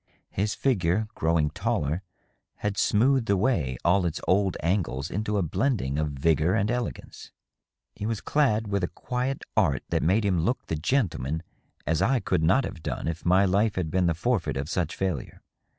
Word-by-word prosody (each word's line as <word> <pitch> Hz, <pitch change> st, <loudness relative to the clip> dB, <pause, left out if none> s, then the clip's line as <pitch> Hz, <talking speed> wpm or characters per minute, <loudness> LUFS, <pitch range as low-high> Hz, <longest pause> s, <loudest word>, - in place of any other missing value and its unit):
His 105 Hz, +2 st, -1 dB
figure, 105 Hz, -5 st, +1 dB
growing 80 Hz, -2 st, +1 dB
taller, 75 Hz, +5 st, -1 dB, 0.5 s
had 105 Hz, -1 st, -2 dB
smoothed 120 Hz, +4 st, +2 dB
away 95 Hz, -, +1 dB
all 90 Hz, +3 st, +4 dB
its 85 Hz, -1 st, -2 dB
old 95 Hz, -1 st, +2 dB
angles 85 Hz, -7 st, -1 dB
into 105 Hz, +2 st, -1 dB
a 100 Hz, -, +1 dB
blending 80 Hz, -, 0 dB
of 75 Hz, -1 st, 0 dB
vigor 80 Hz, +5 st, +2 dB
and 105 Hz, +1 st, +1 dB
elegance. 120 Hz, 0 st, -5 dB, 0.6 s
He 105 Hz, -, -4 dB
was 115 Hz, -2 st, -1 dB
clad 110 Hz, -8 st, +1 dB
with 100 Hz, -2 st, -1 dB
a -, -, +2 dB
quiet 125 Hz, +6 st, -3 dB
art 70 Hz, -1 st, +2 dB
that -, -, +1 dB
made 100 Hz, +6 st, +2 dB
him 90 Hz, -4 st, +2 dB
look 125 Hz, +9 st, -1 dB
the 80 Hz, -, -2 dB
gentleman 80 Hz, -, -1 dB, 0.4 s
as 80 Hz, -1 st, +1 dB
I 135 Hz, -1 st, +3 dB
could 90 Hz, -5 st, 0 dB
not 95 Hz, +13 st, +3 dB
have 85 Hz, -, -6 dB
done -, -, -4 dB
if 80 Hz, +1 st, -4 dB
my 95 Hz, +3 st, +5 dB
life 100 Hz, +3 st, +2 dB
had 80 Hz, -4 st, -2 dB
been 90 Hz, -1 st, +2 dB
the 85 Hz, -, +1 dB
forfeit 105 Hz, -, 0 dB
of 70 Hz, +3 st, -3 dB
such 85 Hz, -2 st, -1 dB
failure. 95 Hz, -2 st, -3 dB
95 Hz, 180 wpm, -26 LUFS, 80-110 Hz, 0.6 s, my